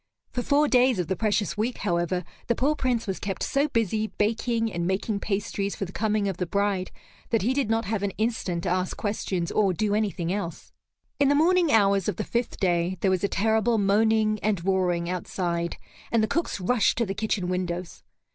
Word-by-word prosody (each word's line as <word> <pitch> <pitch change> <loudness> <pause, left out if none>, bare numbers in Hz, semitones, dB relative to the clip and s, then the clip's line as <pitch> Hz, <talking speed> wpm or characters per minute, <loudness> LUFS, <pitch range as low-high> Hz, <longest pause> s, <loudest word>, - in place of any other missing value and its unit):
For 245 - -2
four 290 +4 +3
days 250 -3 +4
of 180 -1 -2
the 190 - +1
precious 210 0 0
week, 225 +4 -1
however, 175 -1 -1 0.2
the 235 - +2
poor 285 +4 +2
Prince 250 -5 0
was 195 -3 -3
kept 195 -1 -3
so 280 +2 +1
busy 220 -3 0
baking 225 +1 0
and 170 0 -1
making 200 +2 -1
pastries 200 0 -2
for 195 - -3
the 180 - -9
coming 215 0 0
of 190 -3 -2
the 180 - -2
bride 200 0 0 0.4
that 225 -4 +1
he 245 +5 +2
did 270 -5 0
not 225 0 +1
have 210 0 -1
an 200 - 0
instant 215 -6 -1
to 180 - -1
ask 185 +1 -1
questions 190 -4 -2
or 200 -3 +2
do 205 +3 0
anything 195 -5 0
else. 195 -5 -5 0.5
In 280 -1 +4
the 285 - +4
morning 340 +1 +4
hours 200 -3 +3
of 205 - -2
the - - -3
fifth 235 0 -2
day 175 -1 +1
there 190 - +3
was 185 0 0
a - - +3
terrible 220 +3 +2
moaning 215 +1 +2
and 200 -5 0
roaring 180 -3 +1
outside, 175 -1 -2 0.3
and 230 -2 +3
the - - +2
cooks 335 -3 -1
rushed 220 +5 +2
to 235 - +2
the 195 - -3
kitchen 205 -3 -1
windows. 180 -1 -3
205 Hz, 205 wpm, -26 LUFS, 185-225 Hz, 0.5 s, days